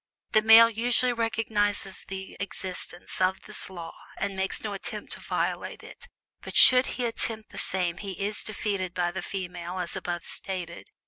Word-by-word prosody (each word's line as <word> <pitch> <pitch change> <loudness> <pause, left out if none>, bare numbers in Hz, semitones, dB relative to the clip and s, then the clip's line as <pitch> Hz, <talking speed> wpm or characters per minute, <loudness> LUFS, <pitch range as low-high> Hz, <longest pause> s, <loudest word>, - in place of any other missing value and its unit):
The 215 - +5
male 225 +1 +9
usually 240 +2 +1
recognizes 220 -4 -1
the 190 0 -7
existence 185 -2 -5
of 185 +1 +1
this - - -8
law, 170 -3 -8 0.2
and 195 - -2
makes 190 0 -1
no 215 -2 -3
attempt 195 - -6
to - - -3
violate - - -3
it, 485 - -12 0.3
but - - -8
should 255 0 +8
he 250 - 0
attempt 225 -1 -1
the - - -6
same 180 -2 +2
he 195 0 -5
is 200 +3 0
defeated 200 -4 -3
by 175 -1 0
the 190 - -4
female 180 -2 -5
as 180 -2 -3
above 175 -1 -4
stated. 180 -3 -4
195 Hz, 170 wpm, -27 LUFS, 180-220 Hz, 0.3 s, male